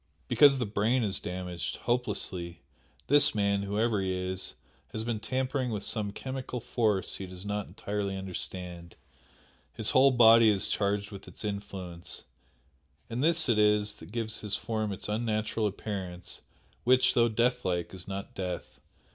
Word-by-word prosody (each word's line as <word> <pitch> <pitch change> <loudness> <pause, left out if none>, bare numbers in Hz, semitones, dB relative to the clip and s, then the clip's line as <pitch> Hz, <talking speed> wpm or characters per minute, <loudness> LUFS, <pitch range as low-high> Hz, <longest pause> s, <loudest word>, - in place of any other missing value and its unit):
"Because 145 -2 +6
the 125 - 0
brain 110 +5 +1
is 100 -3 +1
damaged 90 -1 -4
hopelessly! 95 -8 -2 0.4
This 145 -3 +5
man 100 -1 +2
whoever 105 +1 0
he 95 -1 -1
is 95 0 -2 0.4
has 110 - -2
been 115 -2 -2
tampering 130 +3 -1
with 105 -3 -3
some 105 -2 0
chemical 130 +2 -5
force 110 -4 0
he 95 - -6
does 90 +1 -9
not 105 0 -2
entirely 100 -1 -3
understand, 90 -2 -6 0.8
his - - +2
whole 135 +1 +6
body 115 -3 +7
is 95 -3 +1
charged 100 0 0
with 100 -1 -10
its - - -8
influence, 95 -4 -5 0.9
and 120 +4 -1
this 165 0 +3
it 115 -3 +3
is 105 0 +3
that 80 - -12
gives 110 -1 -3
his 105 -1 -1
form 110 -2 -2
its 95 - -4
unnatural 110 0 0
appearance 95 -3 -5 0.4
which, 130 +1 +5
though 120 -1 +4
death 125 +3 +1
like, 90 -1 -1
is 90 -2 -7
not 100 0 -5
death. 90 -2 -5
105 Hz, 155 wpm, -29 LUFS, 95-115 Hz, 0.9 s, body